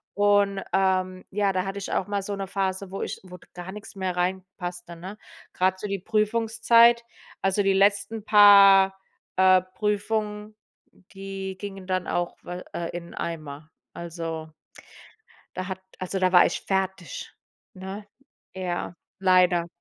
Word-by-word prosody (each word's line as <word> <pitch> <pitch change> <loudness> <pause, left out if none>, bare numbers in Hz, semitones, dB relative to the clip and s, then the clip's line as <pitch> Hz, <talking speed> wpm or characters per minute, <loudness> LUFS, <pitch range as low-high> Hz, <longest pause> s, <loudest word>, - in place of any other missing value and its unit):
und, 205 -1 +3
ähm 185 -1 +1
ja, 200 0 +1
da 185 0 -1
hatte 195 +1 -4
ich 195 - -6
auch 190 - -1
mal 205 -1 -1
so 200 +1 -4
'ne 195 -1 -5
Phase, 195 0 -2
wo 195 - -6
ich - - -5
wo 180 -1 -11 0.2
gar 180 +1 -7
nix 210 +1 -10
mehr 190 -2 -2
reinpasste, 180 -1 -4
ne? 185 +5 -9 0.4
Grad 185 +1 +1
so 210 - -4
die 200 -1 -3
Prüfungszeit 230 +3 +3 0.4
also 195 +1 +1
die 195 0 +3
letzten 205 +3 +2
paar, 200 -2 +7 0.4
äh, 185 0 +5
Prüfungen, 210 +2 -3 0.6
die 195 -1 -6
gingen 195 -2 -8
dann 185 -1 -1
auch 175 0 -2
we 180 +1 -7
äh, 170 -1 -3
in 170 -1 -9
den - - -13
Eimer. 155 -2 -6 0.2
Also 165 -2 -6 1.1
da 185 0 -4
hat 190 0 -5 0.2
also 185 +1 -3
da 185 -1 +2
war 180 - +8
ich - - -2
fertig, 190 - -3 0.4
ne, 190 +2 -8 0.5
ja 180 -2 -4 0.3
leider. 180 -2 +4
190 Hz, 150 wpm, -25 LUFS, 185-205 Hz, 1.1 s, war